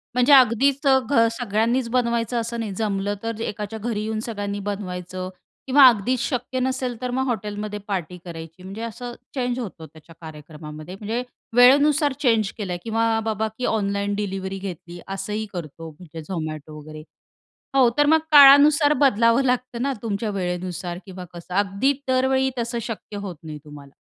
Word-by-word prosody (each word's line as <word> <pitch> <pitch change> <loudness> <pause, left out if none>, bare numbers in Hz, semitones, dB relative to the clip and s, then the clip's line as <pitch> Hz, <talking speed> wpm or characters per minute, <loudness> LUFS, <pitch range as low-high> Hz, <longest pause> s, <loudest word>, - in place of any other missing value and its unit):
म्हणजे 250 +3 +5
अगदीच 270 +3 +4
अ, 265 - +6
घ 230 -5 +4
सगळ्यांनीच 230 +2 0
बनवायचं 235 -1 0
असं 230 +1 -4
नाही. 215 -3 -3
जमलं 200 -1 -1
तर 225 -1 -4
एकाच्या 210 0 -4
घरी 220 -1 -2
येऊन 220 0 -2
सगळ्यांनी 205 -2 -4
बनवायचं 185 -2 -5 0.4
किंवा 270 +1 +7
अगदीच 240 +3 0
शक्य 250 0 -2
नसेल 255 -1 -1
तर 250 - -2
मग 260 +1 0
हॉटेलमध्ये 210 -2 -3
पार्टी 180 -3 -3
करायची 165 +1 -9
म्हणजे 195 +4 -8
असं 240 +1 -6 0.2
चेंज 250 -1 -1
होतं 180 -8 -7
त्याच्या 160 +1 -16
कार्यक्रमामध्ये. 155 +1 -10
म्हणजे 225 +4 -3 0.3
वेळेनुसार 285 +3 +5
चेंज 225 -7 +2
केलंय 185 -5 -3
किंवा 225 0 0 0.2
बाबा 220 0 -1
की 250 - -2
ऑनलाईन 200 -1 -1
डिलिव्हरी 195 -1 -4
घेतली, 175 -2 -8
असंही 195 +3 -4
करतो 165 -1 -7
म्हणजे 160 +1 -11
Zomato 155 -3 -5
वगैरे. 155 0 -10 0.7
हो, 255 -3 +6
तर 290 - +5
मग 320 +2 +5
काळानुसार 290 +1 +8
बदलावं 230 -1 +4
लागतं 250 -1 -1
ना, 275 +1 0
तुमच्या 215 -1 -2
वेळेनुसार 180 -2 -4
किंवा 185 -1 -8
कसं 175 +1 -9
अगदी 200 +7 +2 0.2
दरवेळी 265 +1 +2
तसं 235 0 -2
शक्य 220 -2 -7
होत 195 -4 -6
नाही 155 -2 -8
तुम्हाला. 145 -2 -13
215 Hz, 155 wpm, -23 LUFS, 185-245 Hz, 0.7 s, काळानुसार